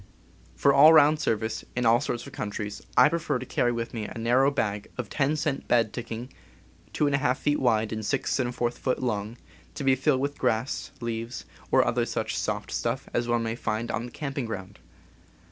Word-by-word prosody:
For 140 - +4
all 150 +4 +8
round 155 0 +6
service, 110 -5 -1
in 125 -1 0
all 115 +2 +5
sorts 120 -5 -3
of - - -11
countries, 105 0 -5 0.2
I 125 - +8
pre 165 +3 0
fer 155 - -1
to 125 - -6
carry 120 0 +1
with 115 -1 -4
me 110 -3 -3
a - - -7
narrow 125 +4 +3
bag 105 -7 -2
of 120 -5 -5
10 145 +1 +1
cent 150 -2 -2
bed 115 -3 +2
tick 120 -1 -6
ing, 120 +4 -6 0.6
2^ 140 -2 +2
feet 145 0 0
wide 110 -4 +1
and 110 - -3
6| 120 0 -1
feet 130 - 0
long, 110 -2 -2 0.4
to - - -4
be 135 -1 +4
filled 130 +1 +2
with 140 +1 -3
grass, 125 +1 -1
leaves, 115 +1 -4 0.2
or - - +5
such - - -3
other - - +1 0.3
soft - - -2
stuff 120 +3 -2
as 120 0 0
one 120 -1 +1
may 115 0 -2
find 115 0 -2
on 120 - -3
the - - -12
camping 140 -2 -4
ground. 95 -4 -7
120 Hz, 195 wpm, -27 LUFS, 115-135 Hz, 0.6 s, all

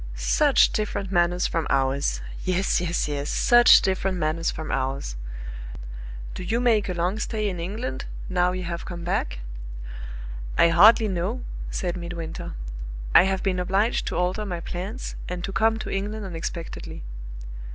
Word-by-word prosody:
Such - - +4
different 200 -2 -2
manners 175 0 +3
from 165 -2 0
ours 135 - +1 0.2
yes, 185 0 +1
yes, 175 -2 0
yes 145 0 -2
such 240 0 +7
different 190 0 0
manners 160 +1 0
from 155 0 -4
ours! 135 - -2 1.2
Do - - -6
you 220 +6 0
make 225 -5 +3
a 180 - -1
long 180 +5 0
stay 215 0 -1
in 180 -3 -3
England, 210 +9 -4 0.2
now 180 -1 +2
you 185 0 -3
have 170 -1 -4
come 175 -1 -6
back?" - - -1 1.2
"I 170 - +6
hardly 215 +6 +7
know," 195 +6 -1 0.3
said 180 -1 -2
Midwinter. 170 -2 -5 0.6
"I 180 - +8
have 190 0 0
been 185 -2 +1
obliged 195 +5 +1
to - - -2
alter 180 +4 0
my 180 -4 -3
plans, 190 +8 -5
and 180 0 -4
to 195 - -3
come 225 +2 +3
to - - -5
England 205 +2 -2
unexpectedly." 165 - -5
180 Hz, 150 wpm, -25 LUFS, 170-200 Hz, 1.2 s, I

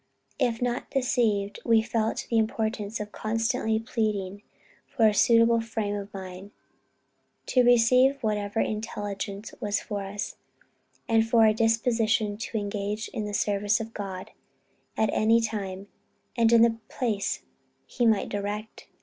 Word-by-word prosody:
If 245 -3 0
not 245 0 -2
deceived, 225 -6 0
we 230 -2 +4
felt 220 -1 -1
the 230 - +4
importance 220 -1 -2
of 210 0 -6
constantly 220 0 -1
pleading 210 -4 -2 0.5
for 230 -5 +1
a 215 - +3
suitable 230 +1 +4
frame 225 -2 -3
of 205 0 -5
mind, 190 0 -8 1.0
to 255 - +3
receive 250 +3 +5
whatever 210 0 -1
intelligence 205 -1 -4
was 205 -1 0
for 205 -3 -5
us; 200 +1 -5 0.7
and 225 -2 +4
for 225 -1 +5
a 215 - +5
disposition 225 -1 +1
to 225 +1 -4
engage 205 +1 -3
in 220 -3 -4
the 205 - -5
service 205 +2 +1
of 225 0 -6
God, 195 0 -6 0.7
at 220 - +2
any 225 +2 +4
time, 200 -4 -4 0.5
and 230 -2 +3
in 230 0 +7
any 225 -1 0
place 220 -6 -2 0.4
he 240 -2 0
might 220 -3 +2
direct. 205 +2 -5
220 Hz, 140 wpm, -27 LUFS, 205-230 Hz, 1.0 s, in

